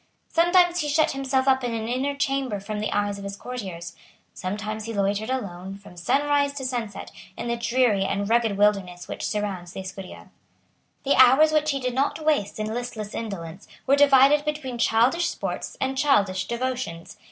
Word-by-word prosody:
Sometimes 350 +1 +4
he 300 -3 -1
shut 310 +2 +3
himself 270 -1 0
up 265 -1 +3
in 240 -1 -2
an 220 0 -3
inner 265 +4 -1
chamber 270 -6 -1
from 210 +2 -5
the 215 - -2
eyes 205 0 -1
of - - -8
his 200 0 -5
courtiers. 190 -8 -7 0.4
Sometimes 215 +3 -4
he 230 -1 -5
loitered 200 +3 0
alone, 195 -6 -4
from 200 -2 -15
sunrise 285 +10 +1
to 275 -2 -5
sunset, 240 -5 -4 0.3
in - - -4
the 235 - +1
dreary 235 -4 +2
and 195 +1 -1
rugged 225 -2 +2
wilderness 195 -4 +1
which - - -4
surrounds 195 -5 -3
the - - -5
Escurial. 190 0 -9 0.8
The 280 - +3
hours 265 +5 +7
which 305 0 +2
he 275 -2 0
did 250 -1 -2
not 280 +4 -1
waste 290 -10 +1
in 215 0 -3
listless 230 -3 -5
indolence 190 -5 -6 0.2
were 275 - +4
divided 280 +1 +6
between 295 -5 -4
childish 245 +10 +3
sports - - -5
and 265 0 -1
childish 205 -10 +2
devotions. 235 -7 -4
235 Hz, 175 wpm, -24 LUFS, 200-275 Hz, 0.8 s, hours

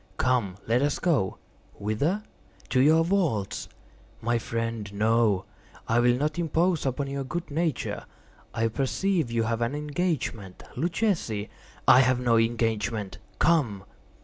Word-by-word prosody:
"Come, 120 -7 +1
let 120 +3 +2
us 145 0 +1
go." 145 - +1 0.4
"Whither?" 140 - -1 0.5
"To 130 - +2
your 160 +4 +5
vaults." 165 - 0 0.5
"My 120 +1 0
friend, 115 -2 -3
no; 110 -1 +2 0.4
I 115 +1 +3
will 120 0 +4
not 150 +4 -1
impose 165 -1 +1
upon 135 +2 -1
your 140 0 -3
good 170 +5 -5
nature. 160 -2 -2 0.5
I 115 0 0
perceive 150 - 0
you 115 -1 0
have 115 +1 -1
an 120 +4 0
engagement. 145 - -3
Luchesi—" 165 - -1 0.4
"I 125 - +9
have 130 -1 +3
no 120 -2 +3
engagement;—come." 110 - 0
120 Hz, 125 wpm, -27 LUFS, 110-155 Hz, 0.5 s, I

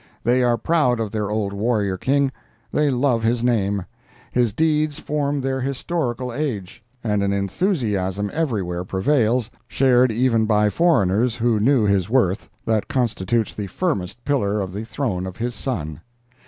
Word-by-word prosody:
They 125 +2 +3
are 120 -1 +3
proud 125 -3 +2
of 110 -3 -2
their 105 -2 -2
old 105 -2 -1
warrior 105 -2 0
King; 135 +7 +1 0.4
they 150 -1 +2
love 125 -2 +1
his 115 +1 +1
name; 100 -6 +1 0.5
his 120 -3 +2
deeds 155 +3 +1
form 145 -1 -1
their 130 0 -1
historical 130 -2 -2
age; 115 -9 -4 0.2
and 105 -3 +1
an 100 0 +1
enthusiasm 100 - -1
everywhere 100 - -1
prevails, 120 +4 +1 0.2
shared 130 -2 +3
even 115 -1 +2
by 105 -1 +3
foreigners 120 - +2
who 115 -2 +1
knew 125 +2 +3
his 100 -2 +1
worth, 115 -5 +1 0.2
that 110 -2 0
constitutes 120 -4 0
the 105 -2 -5
firmest 120 - -3
pillar 105 -8 +1
of 95 -2 -4
the 105 +3 -5
throne 110 -8 -2
of 95 - -8
his 120 +1 -2
son. 80 - -4
115 Hz, 155 wpm, -22 LUFS, 100-130 Hz, 0.5 s, They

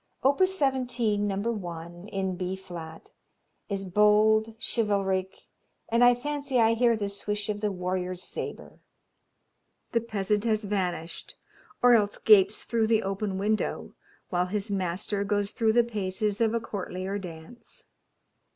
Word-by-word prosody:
Opus 370 +8 +3
17, 245 - +1
No. 195 - -1
1, 175 -4 -5
in 195 -3 -2
B 180 +1 -3
flat, 170 -4 -10 0.6
is 195 -1 -3
bold, 215 +3 +4
chivalric, 195 -4 -1 0.4
and 235 +2 +3
I 245 0 +7
fancy 280 0 -2
I 225 0 +5
hear 235 0 +3
the 205 -2 -2
swish 205 +1 -3
of 205 0 -2
the 210 -1 0
warrior's 180 0 -3
sabre. - - -7 1.1
The 230 - +2
peasant 210 -2 -1
has 215 -1 +1
vanished 180 -5 -3 0.5
or 245 0 +7
else 205 -3 +3
gapes 205 -1 +5
through 225 -2 +1
the 225 -1 +3
open 195 0 -2
window 215 +2 -1 0.4
while 180 0 0
his 205 +2 -2
master 195 +2 -1
goes 205 0 0
through 225 -2 +1
the 240 +1 +5
paces 210 -1 -2
of 225 0 +2
a - - +2
courtlier 195 -2 -4
dance. 170 +4 -10
205 Hz, 140 wpm, -27 LUFS, 190-225 Hz, 1.1 s, I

